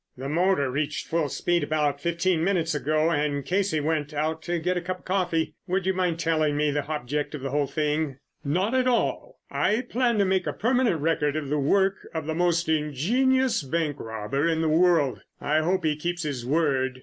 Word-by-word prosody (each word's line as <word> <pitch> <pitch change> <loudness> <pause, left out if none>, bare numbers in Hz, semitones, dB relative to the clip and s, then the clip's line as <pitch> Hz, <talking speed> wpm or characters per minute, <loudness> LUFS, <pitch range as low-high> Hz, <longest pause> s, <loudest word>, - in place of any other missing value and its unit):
"The 130 +2 -5
motor 160 -3 +1
reached 145 +2 -2
full 160 -3 0
speed 175 +5 0
about 150 -2 0
fifteen 170 +1 +1
minutes 175 -4 +1
ago 155 +2 +1
and 145 -3 -1
Casey 190 -3 +1
went 150 0 -1
out 160 +2 -1
to 175 +1 -2
get 180 +2 -1
a 180 - -1
cup 185 +1 -4
of - - -26
coffee. 175 -4 0
Would 185 0 0
you 190 - +2
mind 180 -3 0
telling 155 -3 +1
me 150 0 +2
the 145 0 -2
object 150 0 -3
of 145 - -7
the 135 0 -4
whole 145 0 +1
thing?" 150 0 -1 0.3
"Not 185 - 0
at 255 -1 +2
all. 255 - 0
I 215 +3 +1
plan 245 -1 0
to 200 - +3
make 190 0 +1
a - - -1
permanent 235 - +1
record 150 -2 +1
of 150 -3 -3
the 150 +1 0
work 195 +7 +2 0.2
of 160 -2 -2
the 160 - -2
most 170 0 +1
ingenious 215 - +1
bank 150 +1 -2
robber 115 +7 -2
in 160 -1 0
the 160 - +1
world. 160 -4 +3 0.2
I 150 +2 +1
hope 175 +2 0
he 155 -1 +2
keeps 175 +3 -3
his 135 -5 -4
word." 135 -4 +1
160 Hz, 205 wpm, -26 LUFS, 145-180 Hz, 0.3 s, to